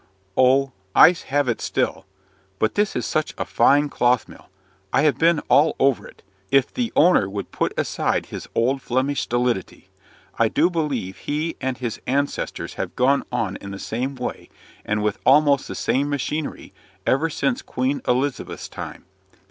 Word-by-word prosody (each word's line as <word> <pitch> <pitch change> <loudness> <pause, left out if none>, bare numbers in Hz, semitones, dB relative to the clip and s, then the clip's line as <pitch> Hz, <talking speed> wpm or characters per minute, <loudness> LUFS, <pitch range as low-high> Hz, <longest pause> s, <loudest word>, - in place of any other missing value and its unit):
"Oh! 130 +1 +4 0.2
I - - +9 0.2
have 145 0 +1
it 115 - -1
still. - - -2 0.5
But 110 - +1
this 210 0 0
is - - -1
such 155 0 -1
a - - -2
fine 145 +1 +3
cloth 125 -4 +1
mill! - - -15 0.4
I 135 - +3
have 150 -2 +2
been 165 -1 +3
all 150 +3 +3
over 135 -2 +2
it. - - -18 0.3
If 135 +3 +2
the 240 -3 -2
owner 150 - +4
would 100 0 -6
put - - -1
aside - - 0
his - - -8
old 130 +4 +1
Flemish 130 +4 0
stolidity! 120 -5 -2 0.5
I - - +5
do 175 - +2
believe 140 - -2
he 155 +3 -2
and 130 -1 -2
his 120 -4 -4
ancestors 140 +2 -2
have - - -5
gone 135 +3 +3
on 115 -6 -2
in 100 - -9
the 100 - -6
same 125 +7 -3
way, 125 -1 -6 0.3
and 105 0 -1
with 105 -1 -1
almost 140 0 +4
the - - -6
same 140 +2 0
machinery, 145 +2 -3 0.3
ever 150 +5 +2
since 240 - -1
Queen 265 +1 -2
Elizabeth's 130 +2 -1
time. - - -8
135 Hz, 165 wpm, -22 LUFS, 125-150 Hz, 0.5 s, I